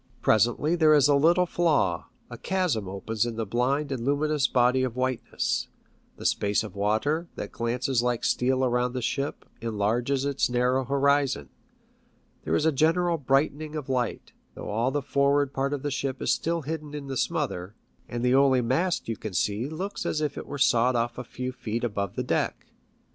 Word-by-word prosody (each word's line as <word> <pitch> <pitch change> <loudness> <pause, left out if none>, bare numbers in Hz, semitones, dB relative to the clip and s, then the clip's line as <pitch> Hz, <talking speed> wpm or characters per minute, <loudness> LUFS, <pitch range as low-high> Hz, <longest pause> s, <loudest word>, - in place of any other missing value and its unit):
Presently 120 +9 +3
there 155 -3 +5
is 145 -2 +5
a 145 - +4
little 170 +6 +4
flaw, 150 - +1 0.2
a - - -8
chasm 180 - -1
opens 105 +3 -2
in 120 -1 -3
the 115 0 -2
blind 130 +7 0
and 125 -4 -3
luminous 145 +1 +1
body 125 +1 +3
of 125 -2 -2
whiteness; 130 -1 -1 0.5
the - - -9
space 105 +1 +1
of 105 -3 -9
water, 110 - 0
that - - -6
glances 120 +1 0
like 120 -1 -1
steel 130 +1 +2
around 125 0 0
the 130 - -3
ship, 140 +4 -2 0.2
enlarges 115 +5 0
its 140 -2 +1
narrow 125 +2 +1
horizon; 140 - +1 1.0
there - - +1
is 155 - +1
a 160 - +4
general 165 +3 +2
brightening 145 +3 0
of 145 -3 -5
light, 125 -3 -2 0.2
though - - -6
all 115 +4 +1
the 145 +1 -2
forward 140 0 +2
part 135 +1 -1
of 145 -2 -3
the 145 - -2
ship 135 -1 -2
is - - 0
still 165 0 -1
hidden 150 0 -5
in 145 -1 -6
the 135 -1 -5
smother, 120 - -2 0.3
and 120 0 -2
the 125 - +3
only 135 -1 +5
mast 150 +10 0
you 115 - -2
can 110 -2 -7
see 105 +8 0
looks 185 +6 -4
as 150 - -1
if 150 -2 -2
it - - -7
were 145 - -5
sawed 125 -2 +3
off 120 +1 -1
a - - -4
few., 125 +1 -5
feet 120 -2 -4
above 100 -5 -2
the - - -1
deck. - - -1
130 Hz, 190 wpm, -26 LUFS, 120-145 Hz, 1.0 s, there